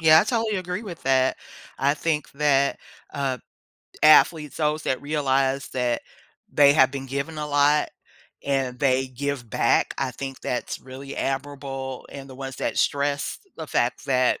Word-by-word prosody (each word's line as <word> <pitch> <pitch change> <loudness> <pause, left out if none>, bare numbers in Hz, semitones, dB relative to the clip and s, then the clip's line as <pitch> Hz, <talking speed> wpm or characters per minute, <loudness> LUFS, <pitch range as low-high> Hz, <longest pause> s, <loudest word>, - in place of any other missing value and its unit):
Yeah, 160 -1 +7
I - - 0
totally 225 -2 0
agree 185 +3 -3
with 175 -6 -8
that. 130 -1 +2 0.4
I 140 +2 +2
think 150 0 -1
that, 140 -1 +2 0.3
uh, 135 -2 -1 0.6
athletes 155 0 +5
those 155 0 0
that 130 - -1
realize 135 -2 0
that 125 -2 -1 0.5
they 140 -1 +6
have 130 -3 +5
been 135 -1 -5
given 140 +4 -4
a 150 - -3
lot 145 +1 +3 0.5
and 135 -3 -1
they 130 -1 +2
give 130 -1 -4
back, - - +2
I 135 -1 0
think 135 0 -7
that's 125 - -3
really 135 +1 -9
admirable, 135 -1 -4
and 135 -1 -9
the 130 - -10
ones 135 0 -6
that - - -2
stress 145 0 0 0.2
the 160 - -6
fact 120 -2 0
that, 130 -2 +2
140 Hz, 160 wpm, -24 LUFS, 130-150 Hz, 0.6 s, Yeah